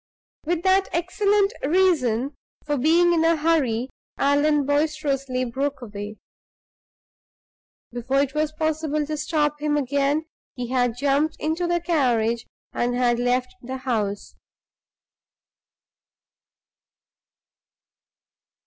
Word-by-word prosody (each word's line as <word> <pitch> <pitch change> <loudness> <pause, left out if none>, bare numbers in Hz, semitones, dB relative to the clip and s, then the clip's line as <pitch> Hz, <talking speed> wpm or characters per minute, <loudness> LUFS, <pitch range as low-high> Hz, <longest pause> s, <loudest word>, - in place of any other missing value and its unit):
With 340 +1 -1
that 380 +1 +3
excellent 400 +4 +1
reason 285 -6 +2 0.3
for 295 - 0
being 335 +6 +4
in 325 -1 +2
a 330 0 +4
hurry, 275 -7 +1 0.3
Allan 290 +1 +2
boisterously 285 -3 0
broke 275 +4 -2
away. 205 -1 -7 1.8
Before 245 +3 0
it 275 -1 -2
was 305 0 0
possible 310 -1 -1
to 305 +1 -3
stop 300 -1 0
him 300 -1 +1
again, 285 +2 0 0.3
he 245 -2 -5
had 245 -2 +1
jumped 285 +3 +1
into 320 +3 -1
the 345 0 +1
carriage 240 -9 +1 0.3
and 245 0 0
had 240 -1 +2
left 250 +1 0
the 260 +1 -5
house. 215 -6 -2
285 Hz, 105 wpm, -23 LUFS, 250-315 Hz, 1.8 s, being